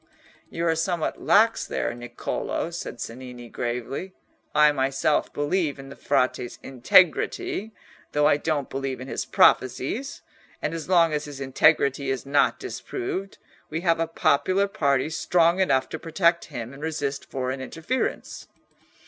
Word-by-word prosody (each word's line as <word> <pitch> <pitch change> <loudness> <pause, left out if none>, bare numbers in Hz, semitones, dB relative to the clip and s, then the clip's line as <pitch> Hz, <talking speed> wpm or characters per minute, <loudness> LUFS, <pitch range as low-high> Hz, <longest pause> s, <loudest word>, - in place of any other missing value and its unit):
"You 170 - -3
are 165 - +3
somewhat 165 0 -1
lax 225 +2 +3
there, - - -2
Niccolò," 120 +7 -4
said 170 -7 -6
Cennini, 120 0 -8
gravely. 125 +11 -4 0.4
"I 150 0 +6
myself 135 +2 0
believe 145 0 -1
in 135 0 -10
the 140 - -10
Frate's 125 -1 0
integrity, 175 - +2 0.4
though 150 0 +2
I 145 - +5
don't 145 -2 -1
believe 135 -1 -4
in 130 - -8
his - - -3
prophecies, 130 - +2 0.4
and - - -2
as 165 0 -6
long 170 -3 +4
as 150 0 -1
his 145 -2 -9
integrity 140 0 +2
is 135 -1 -2
not 140 +1 +2
disproved, 375 - -5 0.3
we 160 +2 -3
have 165 -2 +2
a 165 - +1
popular 185 +5 +2
party 140 -7 +1
strong 170 +2 +2
enough 130 -8 +2
to 160 - -5
protect 170 0 +1
him 120 -4 -7
and 135 - -12
resist 150 -3 -3
foreign 130 0 -3
interference." 165 - -3
150 Hz, 145 wpm, -25 LUFS, 135-170 Hz, 0.4 s, I